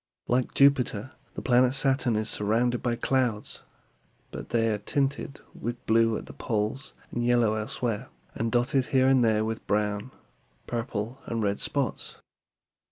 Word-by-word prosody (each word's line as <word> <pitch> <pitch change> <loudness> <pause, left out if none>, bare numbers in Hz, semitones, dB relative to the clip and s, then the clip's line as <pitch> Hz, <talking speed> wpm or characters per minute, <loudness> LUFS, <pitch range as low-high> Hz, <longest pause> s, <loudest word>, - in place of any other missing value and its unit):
Like 125 0 0
Jupiter, 130 -4 +3 0.2
the - - -6
planet 125 +1 +4
Saturn 130 -4 +2
is 110 0 0
surrounded 115 +4 +1
by 120 -1 0
clouds; 120 -3 -1 0.7
but - - -7
they 115 -1 +2
are 105 - -2
tinted 140 +4 -2
with 120 +1 -6
blue 115 0 +3
at - - -8
the - - -10
poles, 110 +4 -3 0.2
yellow 120 -2 +2
elsewhere, 110 +2 -3 0.2
and 115 0 -2
dotted 125 +3 +2
here 130 0 +3
and 130 -2 +5
there 110 -1 +2
with 110 0 -5
brown; 105 +2 0 0.6
purple, 115 +1 -4
and 115 -2 -2
red 100 0 0
spots. 140 -4 -3
120 Hz, 145 wpm, -27 LUFS, 110-130 Hz, 0.7 s, and